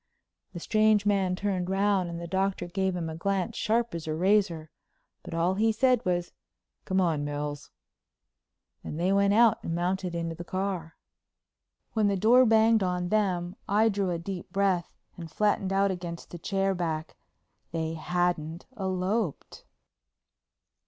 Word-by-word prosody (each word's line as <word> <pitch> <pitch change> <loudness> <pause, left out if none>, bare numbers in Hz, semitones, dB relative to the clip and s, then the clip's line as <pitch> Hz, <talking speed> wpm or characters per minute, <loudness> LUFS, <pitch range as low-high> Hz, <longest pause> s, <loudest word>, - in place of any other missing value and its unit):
The 175 - -6
strange 215 +2 +3
man 195 -3 +2
turned 185 -2 -2
round, 195 -2 +1
and 170 0 -5
the 170 - -6
Doctor 190 +1 -1
gave 190 +1 -1
him 170 -2 -3
a 160 - -5
glance 195 +5 -1
sharp 235 +1 0
as 165 -2 -5
a 155 - -1
razor, 175 -3 +1 0.5
but - - -7
all 170 +2 +2
he 220 +3 +2
said 250 +1 +2
was: 175 -1 -1 0.5
"Come 190 -1 +1
on, 165 -5 +1
Mills," 145 0 -4 1.1
and 150 - -6
they 185 +3 +2
went 200 0 +3
out 230 -2 +4
and 165 - -2
mounted 180 0 -1
into 165 -1 -2
the 175 +1 -8
car. 185 -3 -4 1.0
When 215 -2 +2
the 200 -1 +1
door 240 +6 +5
banged 225 0 +4
on 180 -1 -1
them 185 -4 0
I 215 +3 +4
drew 200 -2 -1
a 175 - -1
deep 175 +1 -6
breath 190 -3 +1 0.3
and 165 -2 -8
flattened 200 +1 0
out 195 0 +2
against 175 -2 -6
the 175 - -7
chair 195 +2 0
back. 160 -3 -3 0.6
They 160 0 -2
hadn't 170 -1 -1
eloped! 190 -2 -2
185 Hz, 155 wpm, -28 LUFS, 170-200 Hz, 1.1 s, door